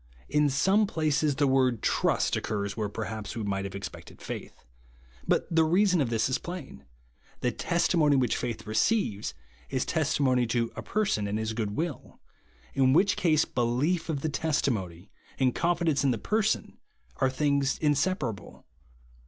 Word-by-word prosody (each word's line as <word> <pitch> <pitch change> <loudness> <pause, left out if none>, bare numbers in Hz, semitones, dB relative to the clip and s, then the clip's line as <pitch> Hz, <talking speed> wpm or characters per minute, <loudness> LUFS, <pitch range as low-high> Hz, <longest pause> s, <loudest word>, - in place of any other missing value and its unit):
In 150 0 +3
some 190 +10 +3
places 155 -4 +1
the 145 - +2
word 130 -4 +2
trust - - +1
cccars 100 -2 -2
wher(3 105 -2 -3
perhaps 110 -1 -5
we 110 - -3
might 100 -1 -2
have 100 - -6
expected 100 - -8
faith. - - -8 0.6
But - - +2
the 165 - +6
reason 180 +1 +3
of 130 - 0
this 110 -2 +1
is 130 - 0
plain; 120 - -8 0.6
the 125 - +1
testimon}^ 160 0 +2
which 125 -3 +1
faith 120 -2 -4
receives, 110 - 0 0.3
is - - -1
testimony 130 -4 +1
to 115 0 0
a - - -5
person 190 - 0
and 100 +1 -1
his 110 0 -2
good 105 -2 -3
will, 165 -3 -4 0.5
in 130 -1 +3
which 190 +5 +4
case, 155 -3 +3
belief 130 +9 0
of 145 -4 -1
the 155 - -1
testimony 110 - -2 0.3
and 130 -2 +2
confidence 170 -4 +1
in 140 - +3
the 120 - +1
person 215 - -1 0.4
are 135 - +2
things 140 0 +1
inseparable. 145 - -1
135 Hz, 155 wpm, -28 LUFS, 110-160 Hz, 0.6 s, the